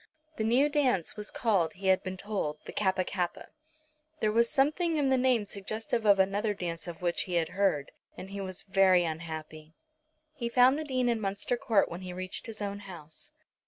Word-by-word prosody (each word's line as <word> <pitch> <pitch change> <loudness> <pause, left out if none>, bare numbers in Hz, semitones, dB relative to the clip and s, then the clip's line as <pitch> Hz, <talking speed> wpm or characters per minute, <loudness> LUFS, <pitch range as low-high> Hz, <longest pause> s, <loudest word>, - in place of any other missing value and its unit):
The 220 - -1
new 245 +6 +4
dance 265 - +1
was 210 0 -4
called, 190 -9 +1
he 195 +1 -10
had 190 - +4
been 185 0 -5
told, 190 -7 -1
the - - -7
Kappa 190 -2 +1
kappa. 180 -2 -3 0.7
There 215 - +1
was 230 +2 +3
something 310 +4 +2
in 280 -2 +2
the 265 - +4
name 250 -4 +2
suggestive 215 +3 -3
of 200 -1 +7
another 200 +2 +1
dance 170 -2 -5
of 175 +1 -8
which 175 -1 0
he 180 - -1
had 165 -2 +1
heard, 185 -7 0 0.3
and 190 - -8
he 200 0 -5
was 185 -1 -5
very 190 -2 +4
unhappy. 160 -1 -6 0.6
He 240 -6 -3
found 255 +4 +5
the - - -2
Dean 255 -4 0
in 235 -2 +1
Munster 200 +4 -1
Court 235 -5 +2
when 170 +2 -7
he 180 -1 -6
reached 185 +5 -5
his 215 -2 -6
own 200 0 -4
house. 175 - -10
200 Hz, 195 wpm, -29 LUFS, 180-235 Hz, 0.7 s, of